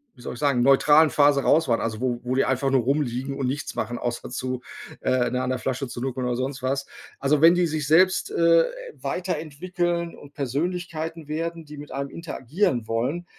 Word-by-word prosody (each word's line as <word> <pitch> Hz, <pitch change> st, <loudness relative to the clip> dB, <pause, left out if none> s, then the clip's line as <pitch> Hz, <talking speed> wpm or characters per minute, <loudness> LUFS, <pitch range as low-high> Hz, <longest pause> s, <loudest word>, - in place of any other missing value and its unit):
wie 120 Hz, -, -16 dB
soll -, -, -6 dB
ich -, -, -10 dB
sagen, 140 Hz, -4 st, +2 dB
neutralen 145 Hz, +4 st, +6 dB
Phase 145 Hz, -1 st, +4 dB
raus 160 Hz, -1 st, +4 dB
waren, 115 Hz, -, +3 dB
also 115 Hz, 0 st, -3 dB
wo 125 Hz, -2 st, 0 dB
wo 125 Hz, +1 st, -1 dB
die 135 Hz, -, +3 dB
einfach 135 Hz, +1 st, +1 dB
nur 130 Hz, -2 st, +4 dB
rumliegen 135 Hz, 0 st, -1 dB
und 135 Hz, -, -1 dB
nichts 140 Hz, +3 st, -3 dB
machen 120 Hz, +2 st, -3 dB
außer 120 Hz, 0 st, -4 dB
zu 125 Hz, 0 st, -3 dB, 0.4 s
äh, 125 Hz, -1 st, +1 dB
ne, 125 Hz, -, 0 dB
an 130 Hz, -, -2 dB
der 130 Hz, -, 0 dB
Flasche 130 Hz, +3 st, -2 dB
zur 120 Hz, +1 st, -6 dB
nuckeln 130 Hz, -1 st, -2 dB
oder 120 Hz, -, 0 dB
sonst 130 Hz, +1 st, -3 dB
was. 135 Hz, +1 st, -1 dB, 0.3 s
Also, 140 Hz, +1 st, +2 dB
wenn 170 Hz, +2 st, +7 dB
die 180 Hz, -1 st, +3 dB
sich 155 Hz, -2 st, -2 dB
selbst, 185 Hz, +4 st, +4 dB
äh, 165 Hz, 0 st, +4 dB, 0.3 s
weiterentwickeln 175 Hz, 0 st, -3 dB
und 145 Hz, 0 st, -14 dB
Persönlichkeiten 160 Hz, +3 st, -3 dB
werden, 165 Hz, +1 st, -3 dB
die 150 Hz, 0 st, -11 dB
mit 145 Hz, 0 st, -10 dB
einem 140 Hz, +1 st, -3 dB
interagieren 145 Hz, -, -2 dB
wollen, 130 Hz, +10 st, -1 dB
140 Hz, 200 wpm, -24 LUFS, 130-165 Hz, 0.4 s, wenn